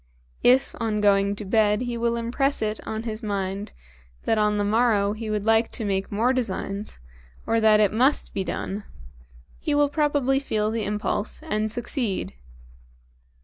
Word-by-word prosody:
If 255 Hz, +2 st, +4 dB
on 220 Hz, -2 st, -1 dB
going 200 Hz, -1 st, +3 dB
to 210 Hz, -, -7 dB
bed 210 Hz, +1 st, +2 dB
he 245 Hz, -1 st, -3 dB
will 235 Hz, 0 st, 0 dB
impress 240 Hz, +3 st, 0 dB
it 215 Hz, 0 st, -2 dB
on 220 Hz, 0 st, -3 dB
his 220 Hz, -1 st, -4 dB
mind 200 Hz, -1 st, -3 dB, 0.5 s
that 220 Hz, -, +1 dB
on 210 Hz, 0 st, +2 dB
the 205 Hz, -, +1 dB
morrow 210 Hz, -2 st, +2 dB
he 220 Hz, 0 st, -6 dB
would 210 Hz, -1 st, -2 dB
like 225 Hz, 0 st, +3 dB
to 225 Hz, -, -2 dB
make 195 Hz, -1 st, -1 dB
more 230 Hz, +5 st, +2 dB
designs, 205 Hz, -, -3 dB, 0.5 s
or 230 Hz, -, +2 dB
that 215 Hz, -1 st, +5 dB
it 210 Hz, -1 st, +3 dB
must 260 Hz, +6 st, +2 dB
be 195 Hz, -, -1 dB
done, 200 Hz, +2 st, -4 dB, 0.8 s
he 300 Hz, -, -1 dB
will 290 Hz, 0 st, +3 dB
probably 285 Hz, -3 st, +1 dB
feel 215 Hz, -6 st, -1 dB
the 225 Hz, -2 st, -2 dB
impulse 210 Hz, +5 st, -2 dB
and 215 Hz, -9 st, -1 dB
succeed. 235 Hz, -2 st, -1 dB
220 Hz, 165 wpm, -24 LUFS, 205-240 Hz, 0.8 s, that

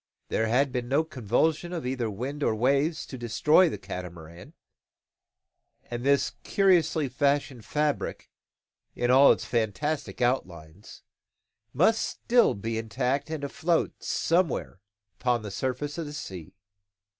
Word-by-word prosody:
There 110 Hz, -, 0 dB
had 130 Hz, +4 st, +2 dB
been 125 Hz, -1 st, -3 dB
no 145 Hz, +4 st, +3 dB
convulsion, 155 Hz, -, 0 dB
either 125 Hz, -2 st, -1 dB
of 105 Hz, -, -5 dB
winds 135 Hz, +8 st, -4 dB
or 110 Hz, -, +2 dB
waves, 140 Hz, +7 st, +1 dB
to 130 Hz, -, -9 dB
destroy 150 Hz, +9 st, +4 dB
the -, -, -5 dB
Catamaran; 85 Hz, -2 st, -9 dB, 1.4 s
and 120 Hz, 0 st, -4 dB
this 140 Hz, +1 st, +2 dB
curiously 170 Hz, -6 st, +2 dB
fashioned 140 Hz, -3 st, 0 dB
fabric, 150 Hz, -1 st, -2 dB, 0.6 s
in 120 Hz, 0 st, +1 dB
all 135 Hz, +2 st, +7 dB
its -, -, 0 dB
fantastic 115 Hz, +6 st, -2 dB
outlines, 95 Hz, -8 st, -3 dB, 0.7 s
must 220 Hz, -, +3 dB
still 240 Hz, 0 st, +2 dB
be 110 Hz, +3 st, -3 dB
intact 125 Hz, +6 st, -2 dB
and 155 Hz, -2 st, -4 dB
afloat 160 Hz, +4 st, -1 dB
somewhere 165 Hz, -, 0 dB, 0.4 s
upon 120 Hz, -3 st, +1 dB
the 105 Hz, -, -6 dB
surface 135 Hz, -, -3 dB
of 160 Hz, -, -4 dB
the 145 Hz, -, -7 dB
sea. 95 Hz, -, -8 dB
130 Hz, 130 wpm, -27 LUFS, 115-150 Hz, 1.4 s, all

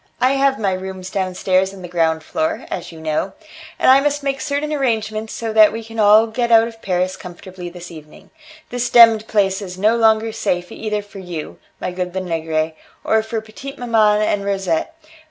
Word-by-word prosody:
I 255 Hz, +1 st, +3 dB
have 275 Hz, 0 st, +2 dB
my 200 Hz, -3 st, 0 dB
rooms 185 Hz, 0 st, -6 dB
downstairs 190 Hz, 0 st, 0 dB
on 185 Hz, -, -11 dB
the -, -, -6 dB
ground 165 Hz, -2 st, 0 dB
floor, 315 Hz, -, -2 dB
as 175 Hz, -, -5 dB
you 165 Hz, -, -12 dB
know, 160 Hz, +4 st, -2 dB, 0.4 s
and -, -, +1 dB
I 265 Hz, -, +7 dB
must 290 Hz, 0 st, -1 dB
make 275 Hz, -1 st, -2 dB
certain 295 Hz, +1 st, -2 dB
arrangements 220 Hz, -5 st, -1 dB
so 225 Hz, -1 st, -4 dB
that 215 Hz, -1 st, +7 dB
we 225 Hz, +1 st, -6 dB
can 225 Hz, 0 st, -8 dB
all 215 Hz, +1 st, +6 dB
get 235 Hz, +1 st, -2 dB
out 225 Hz, 0 st, +6 dB
of 225 Hz, -1 st, -12 dB
Paris 185 Hz, 0 st, -1 dB
comfortably 180 Hz, 0 st, -9 dB
this 175 Hz, 0 st, -10 dB
evening. 155 Hz, -2 st, -14 dB, 0.4 s
The 245 Hz, -, -4 dB
demmed 230 Hz, -2 st, +6 dB
place 195 Hz, -2 st, +1 dB
is 180 Hz, -2 st, -7 dB
no 215 Hz, +4 st, +3 dB
longer 225 Hz, -1 st, +3 dB
safe 180 Hz, -4 st, -2 dB
either 210 Hz, -1 st, -3 dB
for 205 Hz, -1 st, -12 dB
you, 175 Hz, -4 st, -7 dB, 0.2 s
my 180 Hz, -, -3 dB
good 180 Hz, 0 st, -4 dB
Lenegre, 160 Hz, -3 st, -2 dB, 0.3 s
or 220 Hz, 0 st, +2 dB
for 220 Hz, 0 st, -4 dB
petite 270 Hz, +6 st, -10 dB
maman 215 Hz, -3 st, +2 dB
and 205 Hz, -1 st, 0 dB
Rosette. 195 Hz, -, -1 dB
210 Hz, 190 wpm, -19 LUFS, 180-225 Hz, 0.4 s, I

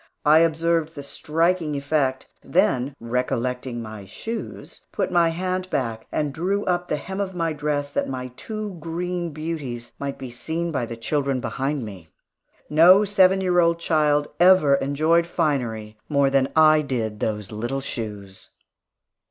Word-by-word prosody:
I 155 Hz, +2 st, +7 dB
observed 165 Hz, 0 st, +1 dB
the 140 Hz, -, -7 dB
striking 165 Hz, +2 st, 0 dB
effect, 140 Hz, -2 st, 0 dB, 0.2 s
then 130 Hz, +2 st, +1 dB
recollecting 125 Hz, 0 st, -2 dB
my 110 Hz, -2 st, -8 dB
shoes, 225 Hz, -, -7 dB
put -, -, -2 dB
my 170 Hz, -2 st, +4 dB
hand 185 Hz, +2 st, -2 dB
back 115 Hz, -7 st, -2 dB
and 150 Hz, -2 st, -1 dB
drew 190 Hz, +6 st, -1 dB
up 180 Hz, -1 st, 0 dB
the -, -, 0 dB
hem 190 Hz, +6 st, -6 dB
of 190 Hz, -2 st, -3 dB
my 165 Hz, -2 st, -1 dB
dress, 145 Hz, -1 st, -2 dB
that -, -, -1 dB
my 130 Hz, -1 st, -4 dB
two 210 Hz, -, -6 dB
green 175 Hz, +2 st, -3 dB
beauties 145 Hz, -7 st, -5 dB
might 140 Hz, -1 st, -4 dB
be 130 Hz, -2 st, -7 dB
seen 165 Hz, +7 st, -3 dB
by 130 Hz, -6 st, -2 dB
the 115 Hz, -, -7 dB
children 135 Hz, +2 st, -1 dB
behind 135 Hz, +1 st, -2 dB
me. 95 Hz, -6 st, -10 dB, 0.6 s
No 180 Hz, +7 st, +6 dB
seven 190 Hz, -1 st, +4 dB
year 180 Hz, -1 st, +2 dB
old 170 Hz, -1 st, +3 dB
child 150 Hz, -3 st, +2 dB
ever 175 Hz, -5 st, +6 dB
enjoyed 155 Hz, +5 st, +2 dB
finery 120 Hz, -11 st, -2 dB
more 140 Hz, -2 st, +3 dB
than 135 Hz, -1 st, +2 dB
I 155 Hz, -1 st, +6 dB
did 115 Hz, -7 st, -3 dB
those 105 Hz, -2 st, -3 dB
little 120 Hz, +6 st, -3 dB
shoes. 105 Hz, -7 st, -6 dB
150 Hz, 150 wpm, -23 LUFS, 125-170 Hz, 0.6 s, I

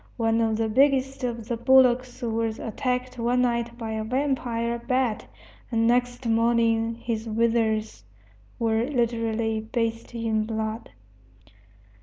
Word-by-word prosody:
One 225 Hz, -1 st, +2 dB
of 220 Hz, -1 st, +1 dB
the 225 Hz, 0 st, 0 dB
biggest 270 Hz, +2 st, +2 dB
of 235 Hz, -3 st, -3 dB
the 240 Hz, -, -1 dB
bullocks 255 Hz, +1 st, +3 dB
was 225 Hz, -1 st, -1 dB
attacked 250 Hz, +2 st, -3 dB
one 245 Hz, +2 st, +2 dB
night 235 Hz, -1 st, -1 dB
by 225 Hz, -2 st, -5 dB
a 220 Hz, 0 st, -2 dB
vampire 235 Hz, -2 st, -1 dB
bat, 250 Hz, -2 st, -1 dB, 0.4 s
and 225 Hz, -1 st, +2 dB
next 245 Hz, +1 st, +1 dB
morning 230 Hz, 0 st, +2 dB
his 230 Hz, -1 st, -4 dB
withers 220 Hz, -, 0 dB, 0.5 s
were 225 Hz, 0 st, +1 dB
literally 230 Hz, -4 st, 0 dB
bathed 230 Hz, +1 st, -3 dB
in 220 Hz, -2 st, 0 dB
blood. 220 Hz, 0 st, -4 dB
230 Hz, 125 wpm, -25 LUFS, 225-245 Hz, 0.5 s, bullocks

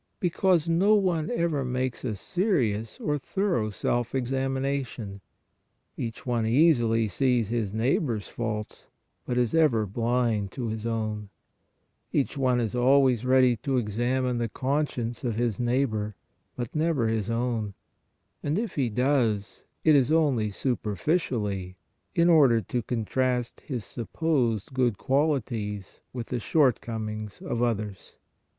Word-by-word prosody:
Be 175 Hz, -, 0 dB
cause 180 Hz, -3 st, +2 dB
no 190 Hz, +6 st, +4 dB
one 175 Hz, -6 st, +1 dB
ever 170 Hz, -, 0 dB
makes 125 Hz, 0 st, -2 dB
a 115 Hz, -5 st, -2 dB
serious 115 Hz, -, 0 dB
or 150 Hz, -1 st, -1 dB
thorough 140 Hz, -, 0 dB
self 120 Hz, +5 st, -1 dB
examination; 130 Hz, -5 st, -2 dB, 0.7 s
each 115 Hz, +2 st, -5 dB
one 120 Hz, -3 st, 0 dB
easily 115 Hz, -5 st, +4 dB
sees 120 Hz, +1 st, +1 dB
his 115 Hz, -4 st, -1 dB
neighbor 120 Hz, +3 st, +1 dB
s 105 Hz, -, -6 dB
faults, 110 Hz, -3 st, -5 dB, 0.4 s
but 125 Hz, -, -1 dB
is 120 Hz, -2 st, +1 dB
ever 145 Hz, -10 st, +3 dB
blind 115 Hz, -1 st, 0 dB
to 120 Hz, -3 st, -3 dB
his 110 Hz, +1 st, -3 dB
own; 110 Hz, -2 st, -3 dB, 0.8 s
each 140 Hz, -, 0 dB
one 130 Hz, -3 st, +2 dB
is 115 Hz, -3 st, -1 dB
al 135 Hz, +3 st, +5 dB
ways 125 Hz, -3 st, +2 dB
ready 130 Hz, -1 st, +5 dB
to 135 Hz, +5 st, -1 dB
examine 120 Hz, +3 st, 0 dB
the 115 Hz, -1 st, -1 dB
conscience 130 Hz, -2 st, -2 dB
of 120 Hz, -4 st, -1 dB
his 115 Hz, -3 st, -1 dB
neigh 125 Hz, +3 st, +2 dB
bor, 105 Hz, -3 st, -3 dB, 0.4 s
but 120 Hz, +2 st, -5 dB
never 155 Hz, -6 st, +1 dB
his 110 Hz, -2 st, -1 dB
own, 115 Hz, -3 st, -1 dB, 0.7 s
and 150 Hz, +4 st, -1 dB
if 220 Hz, -2 st, -2 dB
he 130 Hz, -5 st, 0 dB
does, 115 Hz, -4 st, 0 dB, 0.2 s
it 155 Hz, -, +6 dB
is 135 Hz, 0 st, +3 dB
only 140 Hz, -9 st, +2 dB
superficially 105 Hz, -, -1 dB, 0.4 s
in 170 Hz, 0 st, +4 dB
order 140 Hz, -9 st, +6 dB
to 120 Hz, +2 st, -2 dB
contrast 125 Hz, +2 st, -1 dB
his 125 Hz, -6 st, -3 dB
supposed 120 Hz, -3 st, -1 dB
good 125 Hz, -5 st, +1 dB
qualities 120 Hz, -9 st, -1 dB
with 120 Hz, -2 st, -5 dB
the 125 Hz, -, -3 dB
shortcomings 110 Hz, -6 st, 0 dB
of 120 Hz, -, -2 dB
others. 105 Hz, -5 st, -2 dB
120 Hz, 140 wpm, -27 LUFS, 110-135 Hz, 0.8 s, it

